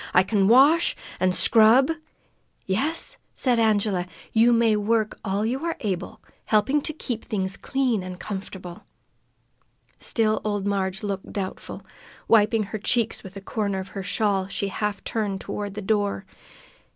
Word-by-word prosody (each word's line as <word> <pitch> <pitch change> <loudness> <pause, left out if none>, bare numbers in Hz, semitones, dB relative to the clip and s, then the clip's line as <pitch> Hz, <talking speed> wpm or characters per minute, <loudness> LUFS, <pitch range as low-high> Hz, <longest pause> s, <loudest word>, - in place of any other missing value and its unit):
"I 180 - +7
can 195 0 +2
wash, 280 +9 +5 0.2
an' 185 0 +3
scrub 230 - +5 0.4
" - - -43 0.3
"Yes," 280 +13 -1 0.2
said 245 -3 +1
Angela, 205 -5 +2 0.3
"you 230 +2 +5
may 230 -2 +4
work 215 +1 0
all 200 +1 -1
you 260 +6 -2
are 335 -1 -1
able, 190 -4 -4 0.2
helping 220 +8 +2
to 310 - -1
keep 250 -7 -4
things 190 -2 -2
clean 255 -6 0
and 180 0 -7
comfortable." 190 -3 -7 1.1
Still 220 -2 +1
old 205 -2 -2
Marg 195 -1 -1
looked 195 -2 -4
doubtful. 190 -2 -6 0.4
Wiping 220 0 +4
her 210 +2 -5
cheeks 225 +1 0
with 190 0 -10
a - - -7
corner 200 -1 -2
of 190 0 -6
the 195 - -4
shawl, 195 -1 0
she 195 0 -2
half 210 0 -3
turned 205 -4 -2
toward 205 0 -5
the 210 - -5
door. 205 -1 0
210 Hz, 150 wpm, -24 LUFS, 195-230 Hz, 1.1 s, I